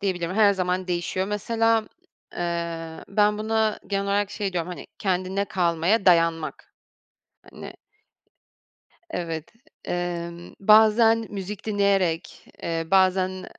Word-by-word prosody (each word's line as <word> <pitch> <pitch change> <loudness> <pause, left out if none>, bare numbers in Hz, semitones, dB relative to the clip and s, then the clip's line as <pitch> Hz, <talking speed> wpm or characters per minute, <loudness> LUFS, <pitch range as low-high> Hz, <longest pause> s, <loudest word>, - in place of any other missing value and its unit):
diyebilirim, 185 -3 -2
her 205 -1 +5
zaman 185 -1 -1
değişiyor. 180 +2 -1
Mesela, 225 +2 +1 0.5
eee, 170 -1 -4
ben 210 +1 +2
buna 220 0 0
genel 200 0 -1
olarak 200 0 0
şey 200 -2 -3
diyorum, 175 -1 -2
hani, 180 - -8
kendine 190 +1 -1
kalmaya 180 +3 +1
dayanmak. 165 -3 +2 0.8
Hani - - -9 1.4
evet. 165 - -4 0.3
Emm, 175 -1 -4
bazen 220 +2 +5
müzik 200 0 -6
dinleyerek, 200 -5 0 0.2
eee, 165 -1 -2
bazen, 185 -1 +2
190 Hz, 105 wpm, -24 LUFS, 175-210 Hz, 1.4 s, her